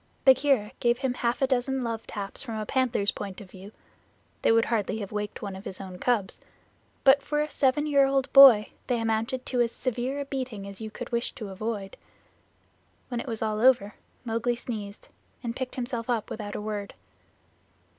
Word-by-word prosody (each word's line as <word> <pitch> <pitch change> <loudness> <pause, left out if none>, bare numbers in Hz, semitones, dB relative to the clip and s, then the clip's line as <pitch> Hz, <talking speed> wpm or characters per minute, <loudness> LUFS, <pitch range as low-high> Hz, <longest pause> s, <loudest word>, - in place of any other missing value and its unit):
Bagheera 265 -5 +4
gave 240 0 +2
him 260 -1 -1
half 245 +1 -1
a - - +7
dozen 260 0 0
love 230 -1 -4
taps 200 -2 -4
from 230 -4 -5
a 215 - -3
panther's 245 -5 +1
point 195 -2 -7
of 195 -4 -12
view 195 +2 -11 0.7
(they - - +4
would 230 0 +4
hardly 220 -2 -1
have 200 -3 -6
waked 210 0 -4
one 200 -2 -4
of 190 - -9
his 190 - -7
own 185 -2 -8
cubs), 220 -6 0 0.6
but 275 +1 +6
for 295 +2 -1
a 300 0 -1
seven 275 +2 +2
year 280 -2 +4
old 270 -1 0
boy 260 -7 +9 0.2
they 245 -2 +1
amounted 225 +3 -1
to 250 -2 0
as 235 -1 +1
severe 255 +3 -2
a 285 - -3
beating 255 -7 -5
as 200 +1 -9
you 220 - -5
could - - -8
wish 235 0 -1
to 215 -3 -7
avoid. 200 0 -4 1.1
When 240 -2 -2
it - - -6
was 225 -2 -3
all 215 -1 -1
over 235 -4 +4 0.3
Mowgli 235 +1 0
sneezed, 210 -4 -6 0.4
and 235 -1 -3
picked 260 -1 -4
himself 240 -2 -4
up 230 -3 -1
without 210 -2 -5
a - - -3
word. 210 -1 -5
230 Hz, 195 wpm, -27 LUFS, 210-260 Hz, 1.1 s, boy